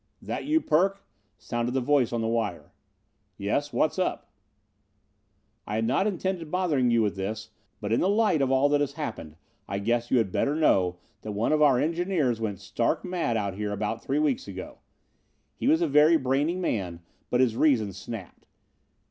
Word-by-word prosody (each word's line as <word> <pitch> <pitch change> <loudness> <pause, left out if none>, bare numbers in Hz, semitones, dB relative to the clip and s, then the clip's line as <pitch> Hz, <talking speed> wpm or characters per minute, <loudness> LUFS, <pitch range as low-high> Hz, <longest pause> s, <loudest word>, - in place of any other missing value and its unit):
"This - - -5
you, 315 +2 +2
Perk?" 195 - +1 0.3
sounded 120 +1 -3
the - - +3
voice 130 -1 +2
on 120 -1 -1
the 110 - -1
wire. 110 -5 -2 0.7
"Yes, 145 +9 -1
what's 155 - 0
up?" 185 - -2 1.4
"I 105 - -3
had 110 +1 0
not 135 - +1
intended 185 -4 -2
bothering 155 -8 +1
you 115 -1 +3
with 105 -2 -1
this, 110 +3 -5 0.3
but 105 +1 -2
in - - +3
the 185 - +2
light 205 -7 +2
of 135 - +2
all 135 +2 +4
that 145 0 +2
has 140 -1 -1
happened 115 - -6 0.3
I 100 - -3
guess 115 +3 0
you 130 - +3
had 110 -5 +1
better 140 +9 0
know 95 - +2 0.2
that 105 - -5
one 105 +7 0
of 155 0 +2
our 140 -4 +5
engineers 165 -7 0
went 105 -4 -3
stark - - -1
mad 170 -11 -1
out 100 -3 -2
here 105 +1 -3
about 105 +2 -3
three 140 - -1
weeks 150 -7 0
ago. 95 -2 -8 0.8
He - - -3
was 160 +2 +4
a - - +2
very 150 +3 +5
brainy 140 +4 0
man 95 - -2 0.3
but 125 - +1
his 125 -4 +3
reason 115 -9 +2
snapped. 95 0 -9
125 Hz, 185 wpm, -27 LUFS, 110-155 Hz, 1.4 s, our